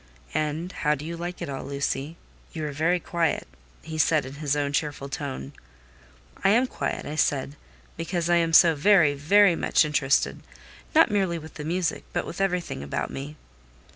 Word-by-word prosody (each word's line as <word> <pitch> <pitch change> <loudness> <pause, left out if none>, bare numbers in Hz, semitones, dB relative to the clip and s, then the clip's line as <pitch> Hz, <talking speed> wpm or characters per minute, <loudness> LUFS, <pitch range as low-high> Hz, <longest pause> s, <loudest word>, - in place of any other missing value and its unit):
"And 155 +3 -2
how 150 -4 0
do 145 +2 -8
you 170 +1 -4
like 175 +1 -5
it - - -4
all, 135 -1 -5
Lucy? 140 +3 -3 0.4
You 155 -2 -4
are 150 - -3
very 165 +5 +1
quiet," 170 -2 -1 0.4
he 160 0 -6
said, 155 -2 +3
in 130 - -8
his 145 -1 +1
own 145 -1 -1
cheerful 145 -2 -2
tone. 140 0 -5 0.9
"I - - +5
am 235 +5 +4
quiet," - - -4
I 145 - -5
said, 140 -2 0 0.4
"because 170 0 -2
I 175 0 +4
am 165 -1 +1
so 165 0 +7
very, 160 -1 +4
very 175 +6 +4
much 165 - +2
interested: 140 -2 +1 0.5
not 320 -7 +6
merely 190 -4 +1
with 160 0 -10
the 150 - -7
music, 170 +2 -1
but - - -1
with 180 - -6
everything 180 - -1
about 70 0 -3
me." 145 +3 -6
155 Hz, 180 wpm, -26 LUFS, 145-175 Hz, 0.9 s, so